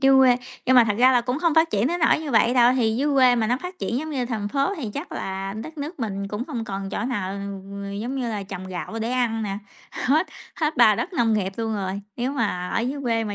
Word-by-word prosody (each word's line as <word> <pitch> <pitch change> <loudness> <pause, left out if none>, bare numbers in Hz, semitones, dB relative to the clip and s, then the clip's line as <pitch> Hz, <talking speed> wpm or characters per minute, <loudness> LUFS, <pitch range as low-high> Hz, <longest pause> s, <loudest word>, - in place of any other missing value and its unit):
Dưới 270 0 +6
quê 255 -2 +6 0.3
nhưng 260 0 +5
mà 245 - +8
thật 210 -2 0
ra 255 +1 +6
là 245 - +4
cũng 250 +3 -2
hông 335 -1 +2
phát 325 +1 +4
triển 210 +4 +1
đến 345 +3 -1
nỗi 320 - +4
như 300 -3 -5
vậy 235 +1 +4
đâu. 245 0 +6
Thì 225 -3 +2
dưới 285 +2 +1
quê 255 -2 +6
mà 225 -2 +1
nó 245 +2 +2
phát 360 0 -7
triển 240 - -1
giống 315 +1 -5
như 255 -4 -1
thành 215 -4 -3
phố 275 - 0
thì 245 -9 -4
chắc 290 +5 -5
là, 195 0 -4
đất 315 0 -10
nước 295 +2 -6
mình 200 -3 -3
cũng 210 +4 -3
hông 230 -2 -3
còn 195 -1 -5
chỗ - - -3
nào, 205 -7 -2
ừm, 200 0 -6
giống 245 +5 -3
như 250 -3 -2
là 210 -3 -3
trồng 190 -1 -7
gạo 185 +4 -5
để 230 +2 -2
ăn 235 -3 0
nè. 200 -1 -3 0.3
Hết 310 +7 +1 0.3
hết 310 -1 -1
bà - - +7
đất - - -3
nông 235 -7 +2
nghiệp 195 -2 -1
luôn 225 -1 -2
rồi, 195 0 -3 0.2
nếu 250 +3 -1
mà 200 -8 -1
ở - - 0
dưới 265 +4 -2
quê 230 -3 0
mà 205 -1 -4
235 Hz, 275 wpm, -24 LUFS, 200-270 Hz, 0.3 s, mà